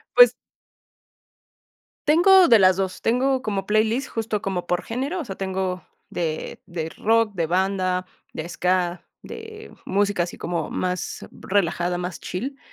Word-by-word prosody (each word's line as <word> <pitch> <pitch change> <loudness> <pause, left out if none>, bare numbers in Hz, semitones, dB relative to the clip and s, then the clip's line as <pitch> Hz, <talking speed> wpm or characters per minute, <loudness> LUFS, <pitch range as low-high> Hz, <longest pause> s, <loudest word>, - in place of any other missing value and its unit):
Pues. - - +8 1.8
Tengo 355 +4 +7
de 230 - +7
las 185 -2 +5
2. 190 -1 -2
Tengo 260 +3 +1
como 200 -6 -2
playlist 220 +5 +1
justo 220 -2 -3
como 185 -2 -3
por 180 0 0
género, 275 +10 -3
o - - -4
sea, 195 -6 -7
tengo 190 -1 -2 0.3
de 160 -3 -3
de 165 -2 -4
rock, 225 0 +2
de 170 -3 0
banda, 185 +1 0 0.3
de 160 - -4
ska, 180 0 -1 0.2
de 440 0 -10
música 200 -2 +1
así 175 - -8
como 170 0 -3
más 180 0 -3
relajada, 175 -2 -1
más 180 -1 -5
chill. 265 +9 -5
195 Hz, 140 wpm, -23 LUFS, 180-230 Hz, 1.8 s, Pues